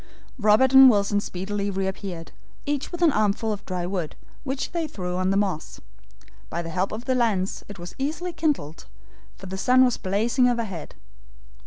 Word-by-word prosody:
Robert 215 Hz, +5 st, +4 dB
and 265 Hz, 0 st, +10 dB
Wilson 205 Hz, -2 st, +2 dB
speedily 200 Hz, +1 st, -3 dB
reappeared, 190 Hz, -3 st, -4 dB, 0.3 s
each 285 Hz, -1 st, -2 dB
with 350 Hz, 0 st, -2 dB
an 325 Hz, -, +6 dB
armful 215 Hz, -1 st, +1 dB
of 205 Hz, -1 st, -8 dB
dry 180 Hz, -2 st, -3 dB
wood, 180 Hz, -4 st, -3 dB, 0.3 s
which 265 Hz, -1 st, -3 dB
they 335 Hz, -2 st, -2 dB
threw 180 Hz, -10 st, -5 dB
on 185 Hz, +1 st, 0 dB
the 195 Hz, -, +2 dB
moss. 190 Hz, -6 st, -2 dB, 0.7 s
By 170 Hz, -, -3 dB
the 165 Hz, -, -6 dB
help 185 Hz, +3 st, -1 dB
of 225 Hz, +3 st, -6 dB
the 260 Hz, -, +1 dB
lens 215 Hz, -7 st, 0 dB
it 205 Hz, -, -9 dB
was 175 Hz, 0 st, -9 dB
easily 325 Hz, +6 st, -3 dB
kindled, 275 Hz, -, -2 dB, 0.5 s
for 195 Hz, -, -12 dB
the 190 Hz, +1 st, -5 dB
sun 255 Hz, +4 st, +5 dB
was 245 Hz, -, +1 dB
blazing 225 Hz, +7 st, +1 dB
overhead. 220 Hz, -9 st, -4 dB
205 Hz, 175 wpm, -24 LUFS, 185-255 Hz, 0.7 s, and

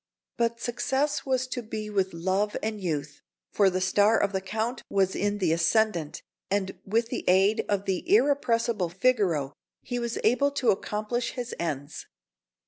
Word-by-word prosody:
But 235 Hz, 0 st, 0 dB
success 270 Hz, +5 st, -1 dB
was 260 Hz, -1 st, +1 dB
to 250 Hz, -, -3 dB
be 215 Hz, -1 st, -5 dB
with 195 Hz, -2 st, 0 dB
love 190 Hz, +5 st, -1 dB
and 215 Hz, -1 st, -3 dB
youth; 150 Hz, -5 st, -3 dB, 0.3 s
for 200 Hz, -2 st, +4 dB
the 185 Hz, 0 st, -1 dB
star 205 Hz, +4 st, +3 dB
of 200 Hz, -, +1 dB
the 190 Hz, -, -1 dB
Count 220 Hz, +6 st, -3 dB
was 190 Hz, -1 st, +1 dB
in 205 Hz, 0 st, 0 dB
the 180 Hz, -5 st, +1 dB
ascendant, 170 Hz, -1 st, +1 dB, 0.3 s
and, 195 Hz, -1 st, -1 dB
with 225 Hz, +3 st, 0 dB
the 245 Hz, -, -3 dB
aid 195 Hz, +4 st, +4 dB
of 200 Hz, -1 st, 0 dB
the 190 Hz, -2 st, -1 dB
irrepressible 235 Hz, -, +2 dB
Figaro, 180 Hz, -, +1 dB, 0.3 s
he 245 Hz, -1 st, -3 dB
was 235 Hz, -1 st, -3 dB
able 250 Hz, +6 st, +3 dB
to 260 Hz, -4 st, +3 dB
accomplish 215 Hz, +5 st, -2 dB
his 245 Hz, -1 st, -5 dB
ends. 145 Hz, -3 st, -4 dB
210 Hz, 160 wpm, -27 LUFS, 190-235 Hz, 0.3 s, for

